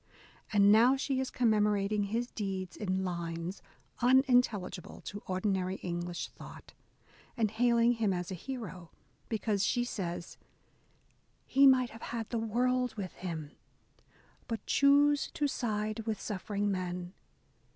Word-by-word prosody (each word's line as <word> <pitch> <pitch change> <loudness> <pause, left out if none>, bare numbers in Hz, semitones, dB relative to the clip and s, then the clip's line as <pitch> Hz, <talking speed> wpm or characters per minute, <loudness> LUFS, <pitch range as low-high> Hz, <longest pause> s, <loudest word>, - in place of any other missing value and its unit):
And 205 -1 +6
now 235 +5 +6
she 270 -1 -1
is 265 - -1
commemorating 210 -3 +2
his 230 +4 -2
deeds 190 -4 -4
in 190 -2 -1
lines 170 0 -4 0.4
unintelligible 245 - +2
to 205 0 -7
ordinary 185 0 0
English 175 -1 -4
thought, - - -12 0.6
and 220 -3 +1
hailing 235 +1 +3
him 225 -4 +1
as 180 0 -3
a - - -2
hero, 185 -5 -7 0.4
because, 210 -2 0
she 240 +4 +1
says, 175 -7 -5 1.1
He 275 +1 +5
might 255 -2 +4
have 225 - -12
had 230 -2 -4
the 235 - 0
world 250 +2 0
with 195 -4 -5
him. 160 -5 -6 1.0
But 225 -1 -4
choose 285 +1 +4
to 295 - +1
side 215 -5 -2
with 215 -3 -1
suffering 205 0 -2
men. 180 -1 -4
210 Hz, 130 wpm, -31 LUFS, 185-240 Hz, 1.1 s, And